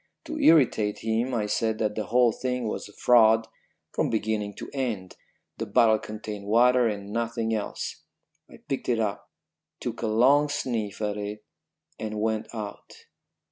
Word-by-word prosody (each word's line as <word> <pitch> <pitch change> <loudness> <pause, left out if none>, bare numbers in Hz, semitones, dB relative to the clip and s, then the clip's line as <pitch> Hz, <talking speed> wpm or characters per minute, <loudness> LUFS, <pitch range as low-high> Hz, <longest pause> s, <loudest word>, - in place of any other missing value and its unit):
To 310 -1 -5
irritate 130 - +4
him 115 +3 0
I 105 -2 0
said 110 +1 0
that 105 -1 0
the 105 0 -3
whole 120 +3 +4
thing 125 0 -2
was 105 - -4
a - - -16
fraud 115 -1 +5 0.4
from - - 0
beginning 105 -2 -1
to - - -7
end; 115 -9 -3 0.4
the - - -3
bottle 110 -2 +4
contained 105 -1 -7
water, 120 +3 +4
and 100 -1 -4
nothing 115 -1 -1
else. 105 -2 -4 0.5
I - - -13
picked 135 -3 -3
it 120 - +2
up, 105 -3 -2 0.5
took 120 -2 -5
a 115 - 0
long 135 +7 +4
sniff 110 -7 -3
at 105 0 -1
it, 105 +1 -5 0.6
and 110 -1 -4
went 110 0 -1
out. 105 -3 -8
110 Hz, 160 wpm, -26 LUFS, 105-120 Hz, 0.6 s, fraud